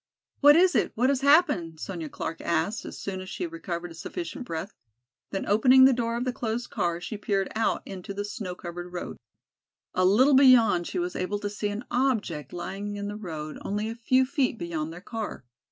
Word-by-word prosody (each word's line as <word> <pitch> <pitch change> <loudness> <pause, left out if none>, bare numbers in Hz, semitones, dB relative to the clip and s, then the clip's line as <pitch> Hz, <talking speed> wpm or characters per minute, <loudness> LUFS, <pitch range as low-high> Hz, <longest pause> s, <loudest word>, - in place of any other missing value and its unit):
"What 290 +1 +8
is 360 +1 +5
it, - - +1
what 250 +4 +2
has 275 -1 +1
happened?" 280 - +3
Sonya 165 -4 -5
Clark 165 - -5
asked, 170 +7 -1
as - - -7
soon 190 -1 -5
as 185 - -8
she 360 - -4
had 340 - -4
recovered 175 - -5
sufficient 300 - -6
breath, 170 +3 -5 0.6
then 195 - -3
opening 255 +5 +6
the 265 - +6
door 235 -1 -1
of 245 - -2
the 255 - -1
closed 235 0 -3
car 170 -1 -1
she 210 +5 -6
peered 195 -2 -1
out 225 - 0
into 190 0 -7
the 205 +1 -3
snow 205 -4 -5
covered 175 0 -7
road. 180 - -6 0.8
A 185 - +1
little 235 +10 +5
beyond 250 -10 +6
she - - -4
was 180 0 -2
able 185 +3 -1
to 205 0 -4
see 210 0 -2
an 205 +4 -5
object 220 - 0
lying 195 +4 -5
in 205 0 -4
the 205 - -5
road 160 -7 -6
only 210 +2 -2
a - - -6
few 255 +3 +3
feet 260 -3 0
beyond 165 -4 -3
their 175 +2 -9
car. 220 - -6
205 Hz, 205 wpm, -27 LUFS, 175-250 Hz, 0.8 s, What